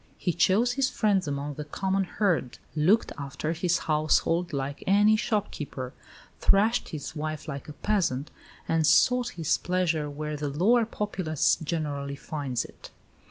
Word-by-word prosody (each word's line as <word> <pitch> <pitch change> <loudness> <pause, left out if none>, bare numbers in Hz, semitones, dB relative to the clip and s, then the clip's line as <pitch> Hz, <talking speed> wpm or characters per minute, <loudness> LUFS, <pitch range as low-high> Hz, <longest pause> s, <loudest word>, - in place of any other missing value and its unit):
"He 175 - -1
chose 195 +8 +3
his 260 +1 +1
friends 200 -6 +1
among 145 +1 -3
the 150 - -6
common 190 +6 -1
herd; 180 - 0 0.2
looked 180 +9 +3
after 140 +3 -3
his 175 +1 +1
household 160 +3 +1
like 140 0 -4
any 205 +2 +5
shopkeeper; 155 - -3 0.5
thrashed 215 +5 +3
his 155 +1 -6
wife 155 +1 -4
like 140 0 -6
a - - -7
peasant; 160 -8 -1 0.4
and 160 -2 +2
sought 250 +8 +4
his 160 -3 +1
pleasure 170 -5 0
where 150 +1 -4
the 145 0 -3
lower 215 - +3
populace 185 -9 0
generally 145 -3 -3
finds 140 -3 -3
it." - - -13
160 Hz, 145 wpm, -27 LUFS, 145-195 Hz, 0.5 s, any